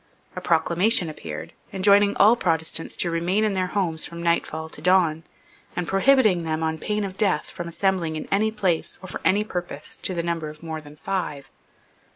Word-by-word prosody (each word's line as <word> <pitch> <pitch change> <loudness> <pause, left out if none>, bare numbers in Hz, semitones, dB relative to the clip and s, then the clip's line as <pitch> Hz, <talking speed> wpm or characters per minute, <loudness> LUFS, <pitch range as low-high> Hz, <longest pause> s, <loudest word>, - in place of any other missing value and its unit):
A - - -4
proclamation 175 +5 +2
appeared, 80 - -7 0.2
enjoining 200 +1 +4
all 215 +4 +7
Protestants 165 -5 -2
to 170 - 0
remain 175 +5 +1
in 215 -2 +1
their 185 -1 0
houses 175 -5 0
from 170 0 -6
nightfall 160 -2 0
to - - -10
dawn, 175 -4 +3 0.5
and 180 - -2
prohibiting 215 -2 +4
them, 160 -1 -2
on 160 0 -1
pain 210 +3 -1
of 190 -1 -5
death, 190 -8 +1
from 175 - -6
assembling 170 -2 0
in 155 - -5
any 210 +2 +3
place 190 -7 -1
or - - -7
for - - -6
any 205 +2 +3
purpose 175 -7 -6
to 185 - -3
the 170 - -1
number 165 -2 -2
of 150 +1 -13
more 160 -1 -5
than 150 -1 -13
five. 150 -4 -4
175 Hz, 190 wpm, -24 LUFS, 160-195 Hz, 0.5 s, all